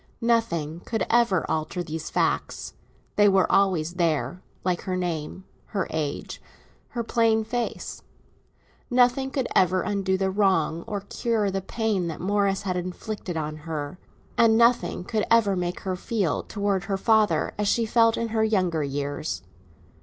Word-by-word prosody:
Nothing 170 -10 +1
could 220 +2 -2
ever 230 -6 +3
alter 160 +3 -2
these 160 -1 -5
facts; - - -1 0.4
they 205 0 +6
were 190 -1 +4
always 175 -4 +2
there, 175 0 0 0.2
like 180 -1 0
her 185 - -3
name, 175 0 -3 0.2
her 195 -3 -1
age, 150 -3 -3 0.5
her 235 -2 -4
plain 225 -1 +2
face. 240 +2 -4 0.9
Nothing 250 +1 +3
could 265 -2 -1
ever 185 0 +3
undo 195 -2 0
the 190 0 0
wrong 185 -5 +2
or 205 -3 -3
cure 215 0 -1
the 195 0 -2
pain 205 -2 -1
that 160 - -5
Morris 200 +1 +1
had 185 -2 -1
inflicted 180 0 -5
on 155 -1 -3
her, 155 +1 -5 0.4
and 225 -1 +6
nothing 230 -7 +3
could 215 +3 -1
ever 225 -4 +4
make 180 -1 -2
her 185 -1 -2
feel 195 -3 -1
towards 200 -2 -1
her 195 -1 -1
father 215 +1 +2
as 210 - +1
she 230 +2 +2
felt 230 0 +4
in 230 0 -1
her 220 0 +1
younger 185 -7 +1
years. 145 0 -3
195 Hz, 155 wpm, -25 LUFS, 175-220 Hz, 0.9 s, they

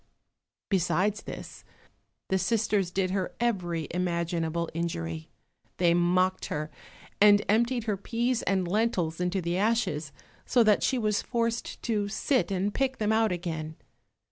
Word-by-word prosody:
Besides 195 +2 +1
this, - - -9 0.7
the 190 - +2
sisters 210 -4 +1
did 185 0 -1
her 190 -1 -2
every 175 -9 -1
imaginable 170 -1 -1
injury—they 165 - -3
mocked 180 +2 +2
her 150 +1 -4 0.5
and 205 0 +6
emptied 235 +3 +2
her 210 -3 -1
peas 235 +4 -1
and 190 -2 0
lentils 180 -5 0
into 180 +1 0
the 170 +1 -1
ashes, 195 -9 0 0.3
so 245 - +3
that 215 -2 +4
she 265 - +1
was 215 -3 +1
forced 230 -1 -2
to 210 -3 0
sit 245 +5 0
and 195 +1 -1
pick 265 -1 0
them 215 0 0
out 220 -1 +3
again. 160 -3 -4
190 Hz, 135 wpm, -28 LUFS, 170-220 Hz, 0.7 s, and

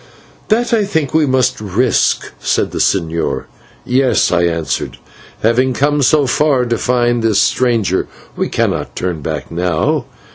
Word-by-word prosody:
"That, 235 +2 +1
I 220 -2 +3
think, 160 -8 -2
we 155 -2 +3
must 130 -1 +1
take 105 - -7
the - - -11
risk 125 +2 +2
of," - - -11
said - - 0
the - - -4
señor. 85 -3 0 0.4
"Yes," 130 +1 +2
I 85 -1 +2
answered: 85 -2 -2 0.5
"having 125 +4 +2
come 145 +3 +1
so 145 +2 +3
far 135 -1 +2
to 120 -1 -1
find 120 -1 +1
this 110 -3 +2
stranger, 115 -7 +1 0.3
we - - -2
cannot - - -2
turn 90 -4 -3
back - - -5
now. 90 - 0
125 Hz, 160 wpm, -15 LUFS, 95-140 Hz, 0.5 s, I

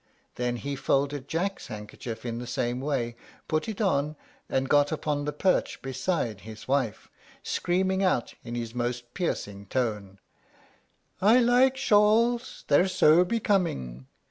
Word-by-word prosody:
Then 125 0 -1
he 140 +4 -4
folded 140 0 0
Jack's 190 +4 -2
handkerchief 110 +1 -7
in 115 -1 -3
the 120 - -6
same 120 0 -1
way, 130 -5 -1 0.3
put 155 +7 -1
it 215 - -5
on, 150 -8 +1 0.3
and 135 0 0
got 145 +1 +4
upon 150 -2 -1
the 150 - -1
perch 185 +5 +1
beside 130 - -2
his 110 +1 -10
wife, 130 -5 0 0.4
screaming 190 +2 0
out, 180 -10 +1
in 120 0 -6
his 115 -1 -4
most 120 0 -3
piercing 100 - -3
tone, 105 -5 -2 1.0
"I 215 +5 +6
like 255 +2 +4
shawls; 230 +1 +3
they're 150 +6 +4
so 180 -2 +5
becoming." 175 - -1
140 Hz, 140 wpm, -27 LUFS, 120-185 Hz, 1.0 s, I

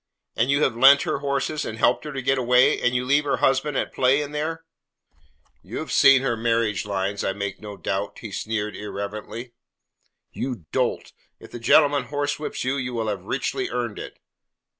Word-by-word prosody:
"And 115 +4 +1
you 140 +2 +3
have 125 - +1
lent 140 +3 +7
her - - -2
horses 140 +2 -1
and 110 - -5
helped 120 +5 +2
her 150 - -5
to 135 -2 -5
get 135 +1 +2
away, 125 0 +4
and 120 0 +1
you 125 0 0
leave 140 +3 +3
her 145 - 0
husband 135 +1 +1
at - - -2
play 130 +2 +3
in 145 - -8
there?" 160 +2 -4 1.0
"You - - -8
have - - -5
seen 135 -1 +6
her 120 -3 0
marriage 115 -4 0
lines, 100 0 -2
I 95 - 0
make 100 0 -5
no 105 -2 -8
doubt," 95 +3 -3
he 110 - -8
sneered 105 0 -3
irrelevantly. 105 +4 -6 0.8
"You 125 -10 -5
dolt! - - -1 0.3
If - - -14
the 120 - -7
gentleman 140 +3 +4
horsewhips 145 +2 -3
you, 130 +2 0
you 130 -2 -3
will 110 -2 -1
have 100 -3 -3
richly - - -2
earned 120 -3 -3
it." - - -9
125 Hz, 190 wpm, -24 LUFS, 105-140 Hz, 1.0 s, lent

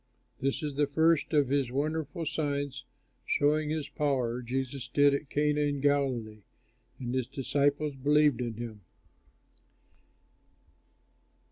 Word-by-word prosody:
This 135 +5 -1
the 145 -1 0
first 160 0 +3
of 145 -4 +3
his 140 -2 +1
wonderful 155 +4 -2
signs, 145 -3 -2 0.4
showing 150 +1 +1
his 155 -2 -2
power, 125 -5 -1
Jesus 130 +2 -3
did 145 +2 +4
at 140 0 -3
Cana 150 0 +1
in 145 -1 0
Galilee; 130 -7 0 0.6
and 125 -2 -4
his 130 -2 -1
disciples 145 +2 0
believed 145 -1 +3
in 120 -2 -3
him. 110 -2 -7
140 Hz, 115 wpm, -30 LUFS, 130-150 Hz, 0.6 s, did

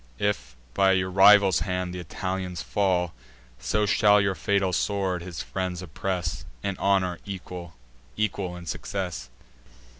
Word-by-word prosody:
If 80 -12 -2 0.2
by 95 -1 +4
your 95 0 0
rival's 95 -2 +7
hand 90 +2 -2
th' - - -5
Italians 90 +1 -4
fall, 90 -4 +1 0.5
So 105 - 0
shall 105 0 +5
your 100 -1 +1
fatal 100 -1 0
sword 95 -2 0
his 85 -1 -6
friends 90 -1 -3
oppress, 90 0 -3 0.2
In 100 -2 -1
honour 95 -3 +1
equal, 90 -4 -7 0.4
equal 100 -4 -1
in 85 -1 -9
success." 90 -8 -4
95 Hz, 130 wpm, -26 LUFS, 90-100 Hz, 0.5 s, rival's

